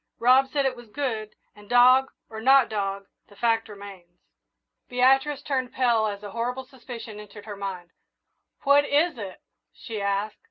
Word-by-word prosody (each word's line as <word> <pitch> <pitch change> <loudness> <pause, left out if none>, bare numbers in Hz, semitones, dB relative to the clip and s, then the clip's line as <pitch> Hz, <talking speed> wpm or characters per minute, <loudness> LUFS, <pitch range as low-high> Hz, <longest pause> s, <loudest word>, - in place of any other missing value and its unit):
Rob 255 +3 +5
said 280 0 -1
it 260 -1 0
was 240 -2 -14
good, 220 -4 -4 0.2
and, 205 -1 -17
dog 255 +2 +5 0.2
or 220 0 -8
not 265 +1 +5
dog, 200 -2 -3 0.2
the 205 - -19
fact 225 0 0
remains." 195 -4 -12 0.7
Beatrice 270 +3 +2
turned 260 -3 -2
pale 235 -4 +2
as 205 0 -6
a 205 - -7
horrible 245 +4 -3
suspicion 240 -4 -10
entered 205 0 -12
her 210 -2 -7
mind. 190 -3 -6 0.7
"What 285 0 +5
is 290 -1 +1
it?" 195 -3 -8 0.3
she 220 -4 -7
asked. 200 +2 -2
230 Hz, 160 wpm, -25 LUFS, 205-260 Hz, 0.7 s, Rob